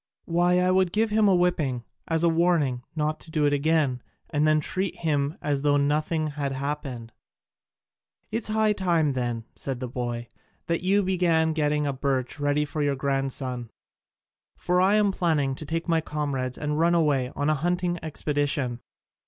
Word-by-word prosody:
"Why, 175 +1 +2
I 180 0 +3
would 185 -1 +3
give 220 +2 +1
him 215 0 +4
a 190 - +5
whipping, 155 -9 +1 0.2
as 165 0 +1
a - - +5
warning 165 -7 +2
not 155 0 -1
to - - -13
do 155 -2 +1
it 145 - +3
again, 145 -3 +1 0.3
and 150 +1 +2
then 155 0 +4
treat 185 +5 -1
him 145 -2 -1
as 145 -2 0
though 145 0 +3
nothing 155 +3 +1
had 140 -2 -3
happened." 135 -4 -4 1.2
"It 225 +2 -1
is - - -4
high 215 -1 +3
time 170 -6 +1
then," 120 -3 -2
said 135 -3 -4
the 130 - -4
boy, 120 -1 -4 0.4
"that 170 0 -1
you 195 +3 +2
began 170 -4 +2
getting 150 -1 +1
a 140 - -1
birch 135 +1 -2
ready 145 +1 +1
for 150 +1 -4
your 145 -1 +1
grandson: 135 -3 -2 0.9
for 180 0 +1
I 195 +3 +4
am 210 -2 +3
planning 155 -7 +1
to 145 +3 -8
take 165 +2 -2
my 165 -1 +2
comrades 140 -5 -3
and 150 0 -2
run 170 +1 +3
away 140 -6 +2
on 145 +2 +1
a - - +3
hunting 175 +3 -1
expedition." 145 -5 -1
150 Hz, 175 wpm, -26 LUFS, 140-170 Hz, 1.2 s, a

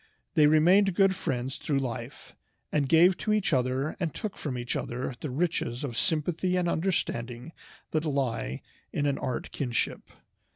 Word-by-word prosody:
They 155 -4 +6
remained 175 +5 +5
good 195 0 +5
friends 130 -6 -3
through 145 - -1
life, 130 -4 -5 0.4
and 145 -3 +1
gave 175 +3 +6
to 215 - -1
each 210 -6 +2
other 130 +3 +1
and 170 -4 -1
took 210 +5 -5
from 135 -5 -4
each 120 +1 -3
other 125 +2 -3
the 150 - -3
riches 135 -4 -1
of 125 -5 -4
sympathy 170 +6 0
and 180 -1 +1
understanding 160 -8 -1 0.4
that 155 0 0
lie 130 - -1 0.3
in 145 - -1
an 140 -1 +1
art 130 -2 -3
kinship. 125 -5 -2
150 Hz, 160 wpm, -28 LUFS, 130-175 Hz, 0.4 s, They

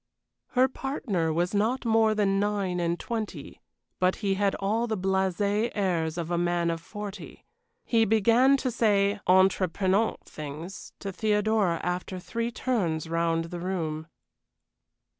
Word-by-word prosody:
Her 255 +1 +6
partner 235 - -2
was 175 +4 0
not 225 +6 0
more 225 -1 +3
than 195 -2 +2
nine 200 -3 0
and 170 0 0
twenty; 225 -3 -5 0.4
but 185 0 +3
he 200 -2 -1
had 200 0 +1
all 220 +4 0
the 220 -2 -1
blasé 190 +3 +1
airs 170 -5 0
of 170 0 -3
a 170 - +1
man 175 -1 +1
of 165 0 -4
forty. 205 0 -8 0.4
He 230 -2 +3
began 230 +6 +4
to 260 -2 -2
say 205 -3 +2
entreprenant 190 +2 +3
things 155 +5 -8
to 200 - -4
Theodora 210 -3 +1
after 180 +1 -3
three 230 +5 -3
turns 190 - -1
round 165 0 0
the 175 - -4
room. 165 -4 -3
195 Hz, 140 wpm, -27 LUFS, 175-220 Hz, 0.4 s, Her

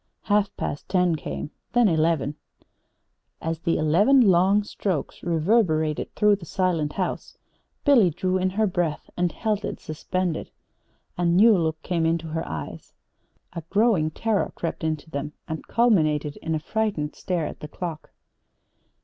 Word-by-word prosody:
Half 205 -1 +1
past 145 - -4
ten 180 -3 +2
came, 150 - -5 0.2
then 240 -2 +5
eleven. 160 -4 +1 1.1
As 165 0 -3
the 165 0 0
eleven 190 - +4
long 195 -1 +4
strokes 190 -7 -3
reverberated 160 -2 +1
through 210 -1 +4
the 180 - -11
silent 165 -5 0
house 185 - -4 0.5
Billy 250 - +6
drew 185 +3 -1
in 185 0 +1
her 215 +4 +1
breath 175 -6 -2
and 175 -1 0
held 215 -2 -2
it - - -4
suspended. 170 +2 -3 0.7
A 175 - +1
new 200 +6 +6
look 160 -3 0
came 165 -2 +1
to 165 0 -8
her 160 +1 -2
eyes. 75 -2 -7 0.6
A 170 - -5
growing 200 -7 +3
terror 220 +5 -1
crept 165 - -4
into 155 -1 -2
them 150 -1 -5
and 160 0 -6
culminated 155 -11 +2
in 160 0 -2
a - - -1
frightened 195 -4 -2
stare 175 -4 -2
at - - -7
the 150 - -7
clock. 165 0 -6
170 Hz, 150 wpm, -25 LUFS, 155-200 Hz, 1.1 s, Billy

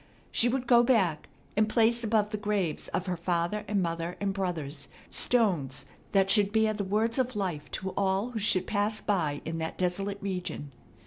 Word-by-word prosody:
She 240 - +4
would 255 +1 -1
go 240 -1 +6
back 195 -11 +2 0.3
and 215 +1 +3
place 235 +2 +3
above 215 -1 +1
the 215 - -1
graves 205 -6 -1
of 185 - -2
her 180 -2 -1
father 175 +4 -1
and 200 -3 +1
mother 170 +1 -3
and 200 -1 -1
brothers 160 -7 -3 0.2
stones 175 - +2 0.3
that 195 -1 +4
should 205 0 +3
bear 220 0 +3
the 205 -1 -3
words 220 +5 0
of 255 -2 0
life 175 -8 -3
to 190 0 -3
all 195 +5 0
who 230 - -3
should 190 -3 +2
pass 210 +1 0
by 160 -8 0
in 165 +1 -3
that 160 0 -4
desolate 195 +2 -1
region. 180 -7 -4
200 Hz, 185 wpm, -29 LUFS, 175-215 Hz, 0.3 s, go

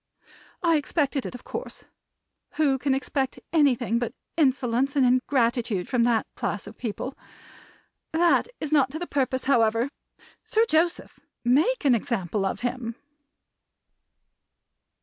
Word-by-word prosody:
I 335 -2 +4
expected 290 -2 -1
it, - - -8
of 250 - -10
course; - - -7 0.7
who 280 -4 +2
can 265 +1 +1
expect 270 -1 -2 0.2
anything 250 -7 +3
but 240 +2 -3 0.2
insolence 270 -2 +1
and 270 -2 +4
ingratitude 240 -6 +1
from 240 -3 +2
that 235 -2 +2
class 205 - -3
of 205 +2 -10
people? 250 +3 -5 1.0
That 335 +1 +3
is 305 - -4
not 280 -4 +4
to - - -3
the 350 - -4
purpose, 265 -4 -1
however. 230 0 +2 0.5
Sir 445 +1 +2
Joseph! 335 0 0 0.3
Make 310 - +2
an 270 - +6
example 205 - -1
of - - -4
him!" 240 -2 -3
260 Hz, 130 wpm, -26 LUFS, 235-290 Hz, 1.0 s, an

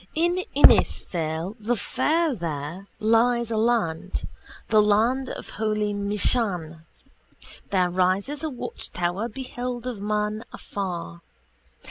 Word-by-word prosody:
In 345 +3 +2 0.2
Inisfail 165 +3 +3
the 225 +3 0
fair 310 +8 +1
there 165 - -5
lies 230 +1 +3
a - - 0
land, 220 -8 0 0.4
the 215 -1 +6
land 230 +6 +2
of - - -7
holy 215 -1 -1
Michan. 200 -5 -1 0.8
There 180 -2 +2
rises 190 +10 +1
a 315 - -1
watchtower 195 -5 -3
beheld 250 -1 -5
of 240 -6 -4
men 210 +1 -1
afar. 170 -3 -5
210 Hz, 105 wpm, -25 LUFS, 180-240 Hz, 0.8 s, the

